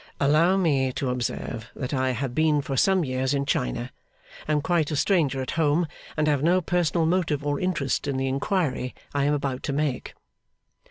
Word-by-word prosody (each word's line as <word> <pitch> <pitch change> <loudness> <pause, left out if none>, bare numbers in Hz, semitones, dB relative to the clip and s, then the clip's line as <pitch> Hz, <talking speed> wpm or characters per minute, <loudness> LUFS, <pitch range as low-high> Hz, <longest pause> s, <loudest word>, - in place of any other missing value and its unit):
'Allow 155 +7 +4
me 140 -8 +2
to 130 -1 -2
observe 115 -2 -4
that 130 +1 -4
I 130 -1 +1
have 125 0 -2
been 150 0 +2
for 135 - -3
some 185 +5 +3
years 130 +1 0
in 140 0 0
China, 60 - -1 0.6
am 150 -1 +2
quite 170 -4 +1
a 155 - -2
stranger 140 -6 +1
at 130 - -4
home, 155 +3 +3 0.3
and 155 0 +2
have 145 -3 +2
no 175 +4 +4
personal 170 -2 +1
motive 160 -4 0
or 145 -1 0
interest 155 -8 -1
in 140 -2 -1
the 135 0 0
inquiry 135 -1 -1 0.2
I 140 -1 +1
am 145 - +2
about 135 -2 -3
to 140 - -3
make. 145 -3 -2
145 Hz, 185 wpm, -25 LUFS, 130-160 Hz, 0.6 s, Allow